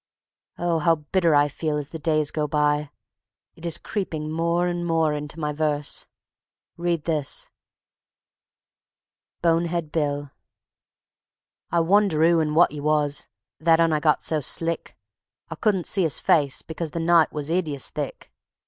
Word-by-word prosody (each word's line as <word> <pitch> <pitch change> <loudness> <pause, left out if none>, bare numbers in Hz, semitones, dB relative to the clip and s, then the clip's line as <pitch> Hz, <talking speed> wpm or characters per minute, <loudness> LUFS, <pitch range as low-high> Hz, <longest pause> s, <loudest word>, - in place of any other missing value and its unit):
Oh, 170 -1 0
how 165 +2 +3
bitter 165 +1 +1
I 145 0 +5
feel 150 +1 -2
as 145 +1 -5
the 160 - -6
days 155 -2 0
go 150 -1 -1
by! 150 0 +1 0.7
It 170 +1 -7
is 165 - -1
creeping 160 -7 -4
more 170 +2 +1
and 175 -1 -2
more 165 -2 +1
into 150 +2 -6
my 150 -1 -2
verse. 150 -1 -2 0.7
Read 170 -2 -1
this: 155 -4 -2 1.9
Bonehead 170 -1 +1
Bill 145 -3 -2 1.4
I 170 0 +2
wonder 190 -1 +3
'oo 170 0 +5
and 155 -1 0
wot 175 - +5
'e 150 - -6
was, 150 -1 0 0.3
That 165 0 +4
'Un 165 -1 +3
I 155 - +2
got 150 0 +2
so 155 - 0
slick. 165 +4 -1 0.5
I - - -1
couldn't 195 -6 0
see 195 - +2
'is 160 -4 +2
face 145 -4 +2
because 160 0 -5
The 165 - -5
night 165 -1 +4
was 150 +1 -4
'ideous 155 -6 -1
thick. - - -6
160 Hz, 150 wpm, -24 LUFS, 150-170 Hz, 1.9 s, I